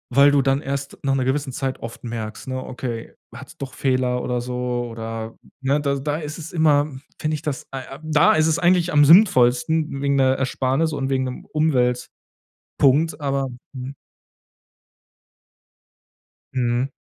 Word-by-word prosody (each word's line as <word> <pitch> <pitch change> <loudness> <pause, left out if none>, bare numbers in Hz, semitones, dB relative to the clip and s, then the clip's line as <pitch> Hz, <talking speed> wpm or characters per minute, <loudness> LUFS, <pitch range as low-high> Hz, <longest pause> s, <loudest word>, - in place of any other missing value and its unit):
weil 140 +3 +5
du 145 0 +4
dann 135 +2 +1
erst 140 0 -4
nach 135 -1 +1
'ner 130 - 0
gewissen 135 +1 -1
Zeit 130 +1 -3
oft 115 +1 -8
merkst, 115 -2 -6
ne, 130 0 -3
„okay, 120 -3 -6 0.2
hat's - - -11
doch 135 -1 -6
Fehler 130 -3 0
oder 125 -1 -1
so 125 0 -3
oder“, 115 0 -6 0.3
ne, 140 +3 +2
da 140 -1 0
da 145 +2 -2
ist 155 0 -6
es 165 0 -8
immer 150 -3 +3 0.3
finde 155 0 -1
ich 150 - -5
das, 150 -4 -4
ah, 135 - -4 0.2
äh - - -15
da 155 0 +4
ist 155 - +3
es 160 0 +1
eigentlich 180 0 +3
am 145 0 +6
sinnvollsten 150 - +4
wegen 140 0 +1
'ner 130 -1 +3
Ersparnis 135 +4 0
und 135 -2 -2
wegen 130 -1 +1
'nem 125 0 -6
Umweltpunkt, 125 -6 0 0.9
aber 140 -1 0 0.3
hm 130 +1 -6 2.6
Mhm. 125 +1 0
135 Hz, 160 wpm, -22 LUFS, 125-150 Hz, 2.6 s, am